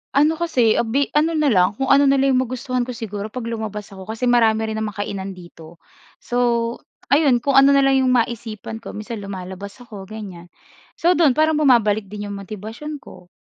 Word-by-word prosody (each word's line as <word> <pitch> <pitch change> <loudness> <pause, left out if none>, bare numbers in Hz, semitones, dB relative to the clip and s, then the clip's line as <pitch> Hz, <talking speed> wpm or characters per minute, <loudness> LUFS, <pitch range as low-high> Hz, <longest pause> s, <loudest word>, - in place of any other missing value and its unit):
Ano 305 +3 +3
kasi, 255 -10 +2
ah, 235 - 0
bi 275 +5 0
ano 315 +2 +1
na 305 -2 +2
lang 185 0 +3
kung 270 +4 -1
ano 280 +1 +6
na 275 - +4
lang 270 0 +2
yung 255 - +3
magustuhan 255 0 -3
ko 250 - -5
siguro 210 -2 -5
'pag 235 +2 -7
lumabas 215 -2 -5
ako 190 -1 -11
kasi 220 +3 -6
marami 225 -3 +3
rin 220 - -3
namang 215 -2 -4
kainan 195 -1 -5
dito. 170 -2 -14 0.4
So, 235 -1 0 0.3
ayun 280 -5 +4
kung 275 -1 +5
ano 280 +1 +6
na 275 - +4
lang 270 0 +4
yung 255 - +2
maisipan 225 -2 -3
ko 230 - -9
minsan 215 +2 -6
lumalabas 195 0 -7
ako 205 -5 -10
ganyan. 195 -5 -9 0.5
So 345 +2 +2
do'n 320 -7 +3
parang 310 0 +2
bumabalik 220 -7 +3
din 205 +1 -7
yung - - -5
motibasyon 220 +9 -8
ko. 180 -1 -14
230 Hz, 200 wpm, -21 LUFS, 205-270 Hz, 0.5 s, ano